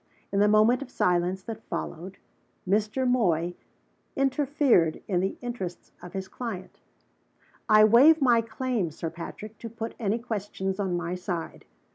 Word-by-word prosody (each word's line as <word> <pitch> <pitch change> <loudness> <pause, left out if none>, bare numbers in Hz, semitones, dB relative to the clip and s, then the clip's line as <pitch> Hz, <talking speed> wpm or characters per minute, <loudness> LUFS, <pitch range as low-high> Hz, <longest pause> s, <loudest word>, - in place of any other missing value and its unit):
In 200 - +1
the 205 - +5
moment 215 +5 +4
of 275 - -7
silence 180 -2 0
that 225 0 -7
followed, 185 -2 -6 0.5
Mr. 215 +6 +1
Moy 175 -9 +2 0.6
interfered 270 - +2
in 185 -4 +1
the 190 +2 -1
interests 235 -8 -6
of 180 0 -10
his 190 -1 -4
client. 190 -4 -7 0.9
"I 215 0 +7
waive 260 +9 +7
my 245 -5 +4
claim, 230 -4 -2
Sir 160 +1 -5
Patrick, 205 +6 -9
to 230 - -7
put 225 0 -6
any 215 -1 0
questions 205 -4 -4
on 185 -3 0
my 175 0 -3
side. 180 -2 -5
210 Hz, 145 wpm, -27 LUFS, 180-240 Hz, 0.9 s, I